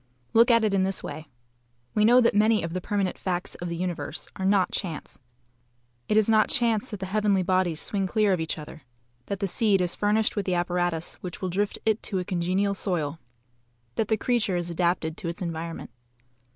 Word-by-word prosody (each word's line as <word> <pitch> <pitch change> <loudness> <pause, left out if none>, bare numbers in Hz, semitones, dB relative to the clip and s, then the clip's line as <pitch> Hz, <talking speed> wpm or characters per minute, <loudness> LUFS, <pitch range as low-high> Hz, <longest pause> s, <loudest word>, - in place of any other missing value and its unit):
Look 230 +2 +6
at 230 -1 +5
it 215 -2 +1
in 195 - +3
this 190 0 0
way. 155 0 -7 0.7
We 210 0 +3
know 245 +3 +7
that 235 - +3
many 215 0 +3
of 165 0 -4
the 185 - -2
permanent 195 -1 -1
facts 180 -1 -2
of 175 - -5
the 170 - -3
universe 175 -5 -4
are 190 - -3
NOT 195 -2 +3
chance. 170 -6 -4 0.9
It 215 - +3
is 215 - +5
not 215 -1 +4
chance 235 0 +2
that 210 - -6
the 190 - -3
heavenly 200 -1 +1
bodies 185 -3 +1
swing 195 +1 -1
clear 210 0 +2
of 180 - 0
each 160 0 -2
other, 155 +1 -9 0.5
that 200 0 -4
the - - +2
seed 200 +1 +2
is 180 -1 +1
furnished 210 +1 +1
with 205 -2 -2
the 180 - +1
apparatus 175 -1 -1
which 180 -2 -6
will 185 - -2
drift 200 +3 -1
it 220 -1 +2
to 195 - -3
a 180 - -2
congenial 185 +2 0
soil, 165 -6 -2 0.7
that 215 - -1
the 220 - +1
creature 215 -5 +1
is 175 0 -3
adapted 170 -2 0
to - - -5
its 170 +1 -4
environment. 165 -4 -5
190 Hz, 205 wpm, -26 LUFS, 175-210 Hz, 0.9 s, know